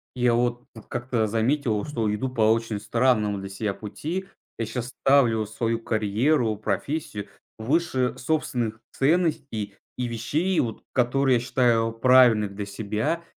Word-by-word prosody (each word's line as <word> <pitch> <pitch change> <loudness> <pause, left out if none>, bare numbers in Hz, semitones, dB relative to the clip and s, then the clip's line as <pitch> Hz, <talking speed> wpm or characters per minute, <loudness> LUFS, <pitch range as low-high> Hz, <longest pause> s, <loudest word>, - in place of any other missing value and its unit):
Я 125 -1 +2
вот 120 0 -1 0.2
как-то 120 -2 -1
заметил, 115 0 0
что 115 -8 -1
иду 120 +5 -2
по 125 -3 -3
очень 115 -2 -1
странному 110 -3 +1
для 95 0 -7
себя 100 +1 -3
пути. 160 - -5 0.3
Я 115 - 0
щас 120 +2 -4
ставлю 120 -6 +4
свою 115 +2 -2
карьеру, 110 +3 +1
профессию 140 +1 -3 0.3
выше 130 +1 0
собственных 125 -5 -1
ценностей 140 - 0 0.2
и 125 - -1
вещей, 150 - 0
вот 115 -2 -2
которые 130 +1 +2
я - - +2
считаю 115 -2 +2
правильных 115 -3 +5
для 100 0 -4
себя. 110 +10 -2
120 Hz, 135 wpm, -25 LUFS, 110-130 Hz, 0.3 s, правильных